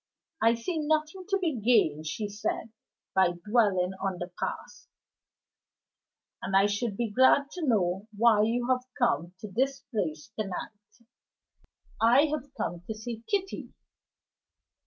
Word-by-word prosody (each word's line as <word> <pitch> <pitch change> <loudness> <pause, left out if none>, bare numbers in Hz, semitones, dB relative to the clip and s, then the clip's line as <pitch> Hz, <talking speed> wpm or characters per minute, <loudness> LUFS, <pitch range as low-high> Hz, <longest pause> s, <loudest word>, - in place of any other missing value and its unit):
"I 230 +1 +5
see 315 +9 -3
nothing 310 +4 -1
to 395 - +3
be 325 -10 -1
gained," 160 -9 +3
she 210 +6 -3
said, 210 +2 -3 0.4
"by 190 -2 +4
dwelling 200 -5 +3
on 190 -2 -1
the 175 0 -6
past; - - -5 1.5
and 190 - -2
I 195 - +5
should 205 0 -1
be 235 -3 -1
glad 260 +5 +4
to 345 -5 -4
know 195 -3 +1
why 225 -1 +5
you 240 +3 +1
have 255 -1 +3 0.2
come 235 -9 +1
to 215 - -7
this 270 +6 0
place 170 -3 -3
to 215 - -1
night." 210 +4 -9 0.9
"I 245 +6 +6
have 285 -2 -4
come 175 0 -3
to 220 - -4
see 225 +1 -6
Kitty." 390 -2 -2
225 Hz, 140 wpm, -28 LUFS, 195-260 Hz, 1.5 s, I